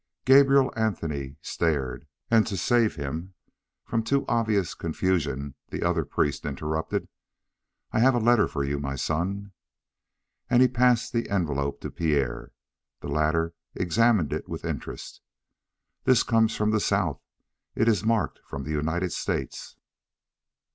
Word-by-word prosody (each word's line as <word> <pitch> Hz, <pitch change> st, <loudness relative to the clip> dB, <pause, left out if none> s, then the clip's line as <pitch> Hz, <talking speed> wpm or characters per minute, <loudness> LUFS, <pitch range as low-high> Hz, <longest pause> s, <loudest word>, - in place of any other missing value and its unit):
Gabrielle 135 Hz, 0 st, +6 dB
Anthony 80 Hz, -11 st, -2 dB
stared, 70 Hz, -7 st, -1 dB, 0.2 s
and 115 Hz, -2 st, +5 dB
to 100 Hz, -, -3 dB
save 115 Hz, +4 st, +2 dB
him 80 Hz, +5 st, -5 dB, 0.5 s
from 115 Hz, -, 0 dB
too 140 Hz, +5 st, 0 dB
obvious 110 Hz, -6 st, +1 dB
confusion 75 Hz, -5 st, -1 dB, 0.2 s
the -, -, -4 dB
other -, -, +1 dB
priest 75 Hz, -, -1 dB
interrupted: 75 Hz, +3 st, -3 dB, 0.8 s
"I -, -, +1 dB
have 130 Hz, +2 st, +5 dB
a -, -, +2 dB
letter 120 Hz, -1 st, +4 dB
for 70 Hz, -, -3 dB
you, 70 Hz, +1 st, -1 dB
my 70 Hz, -1 st, -3 dB
son." 95 Hz, +8 st, -2 dB, 1.0 s
And 125 Hz, 0 st, +6 dB
he -, -, +6 dB
passed 125 Hz, -1 st, +2 dB
the 115 Hz, -1 st, -1 dB
envelope 70 Hz, -7 st, -1 dB
to -, -, -5 dB
Pierre. 75 Hz, -6 st, -1 dB, 0.5 s
The -, -, -6 dB
latter 80 Hz, +3 st, +1 dB, 0.2 s
examined 100 Hz, -2 st, +2 dB
it -, -, -4 dB
with -, -, -5 dB
interest. -, -, -6 dB, 0.8 s
"This 130 Hz, -3 st, +5 dB
comes 115 Hz, -1 st, +2 dB
from 105 Hz, 0 st, +1 dB
the 110 Hz, -, +2 dB
south. 100 Hz, -8 st, 0 dB, 0.5 s
It 115 Hz, -, +2 dB
is 110 Hz, -3 st, +3 dB
marked 115 Hz, -1 st, 0 dB
from 70 Hz, -, -7 dB
the 75 Hz, -, -5 dB
United 80 Hz, +4 st, -1 dB
States." -, -, -4 dB
90 Hz, 140 wpm, -26 LUFS, 75-115 Hz, 1.0 s, Gabrielle